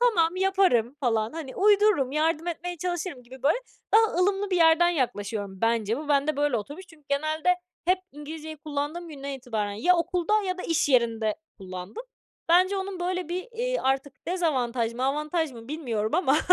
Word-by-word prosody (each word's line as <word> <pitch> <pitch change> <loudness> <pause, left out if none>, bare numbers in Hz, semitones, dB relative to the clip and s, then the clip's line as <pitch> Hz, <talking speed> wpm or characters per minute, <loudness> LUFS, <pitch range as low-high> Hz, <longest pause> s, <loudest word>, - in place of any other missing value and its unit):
"Tamam, 365 -8 +3
yaparım." 370 - +2
falan. 225 -3 +1
Hani, 315 -5 -7
uydururum, 405 -9 +4
yardım 320 +2 +1
etmeye 350 +1 -4
çalışırım 350 -5 -3
gibi 255 +2 -13
böyle 300 - +3 0.4
daha 445 -3 +5
ılımlı 390 +2 +1
bir 365 - +2
yerden 330 +1 +5
yaklaşıyorum. 205 - -2
Bence 225 -1 +1
bu 300 -1 -7
bende 285 +1 +2
böyle 290 -4 +1
oturmuş 290 - -7
çünkü 320 -4 -19
genelde 310 +4 0 0.4
hep 365 +2 +3
İngilizceyi 310 +1 -8
kullandığım 300 +3 -4
günden 280 -2 -7
itibaren 225 -6 -3
ya 350 - +3
okulda 360 +5 +1
ya 370 -1 -2
da - - -4
iş 330 -3 +1
yerinde 230 -4 +2 0.2
kullandım. 185 - -7 0.5
Bence 370 +3 +4
onun 385 -1 -4
böyle 360 -1 -2
bir, 365 +7 -4
eee, - - -1
artık 270 +1 -2
dezavantaj 255 -10 0
mı 255 - -2
avantaj 300 +2 0
mı 230 0 -11
bilmiyorum 235 -9 -2
ama 310 -5 +3
310 Hz, 165 wpm, -26 LUFS, 255-360 Hz, 0.5 s, daha